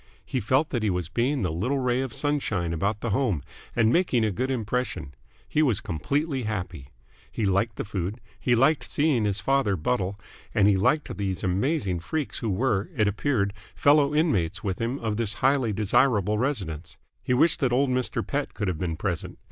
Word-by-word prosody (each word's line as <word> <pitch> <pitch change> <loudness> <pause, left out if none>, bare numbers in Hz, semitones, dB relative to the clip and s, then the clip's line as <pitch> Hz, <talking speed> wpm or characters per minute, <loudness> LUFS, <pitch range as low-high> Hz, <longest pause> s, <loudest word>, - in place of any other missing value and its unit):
He 130 - -2
felt 130 +8 +1
that 120 - -1
he 110 - +1
was 90 -3 -2
being 125 +4 0
the 90 - 0
little 110 - -1
ray 125 -1 +1
of 135 -2 -3
sunshine 110 - -1
about 100 +6 -1
the 120 - -2
home 105 - +1 0.3
and 115 0 +3
making 135 -11 +2
a 110 - +1
good 130 +8 -2
impression. 115 - -2 0.3
He 155 - +1
was 125 -10 +2
completely 140 - -1
happy. 90 - -4 0.4
He 110 - -2
liked 100 +3 +1
the - - -4
food, 100 +2 -3 0.2
he 120 - +2
liked 135 +6 +2
seeing 145 -7 +2
his 100 -2 -1
father 130 -3 +2
buttle, 95 +3 -1 0.4
and 100 - +5
he 105 - +5
liked 145 +11 +1
these 95 -2 -2
amazing 95 - 0
freaks 150 - -2
who 115 - -2
were, 105 -1 0
it 105 - +3
appeared, 105 -1 0 0.2
fellow 145 0 +4
inmates 95 - +1
with 95 -3 -2
him 120 +4 -1
of 110 -5 -2
this 110 -3 0
highly 130 -2 +2
desirable 105 0 +2
residence. 95 - -3 0.2
He 125 - 0
wished 165 +6 +4
that 130 -5 +1
old 130 +2 +2
Mr. 125 0 -1
Pett 145 0 -3
could 105 - -2
have 90 -4 -2
been 85 -2 -2
present. 90 0 -3
110 Hz, 190 wpm, -26 LUFS, 95-135 Hz, 0.4 s, and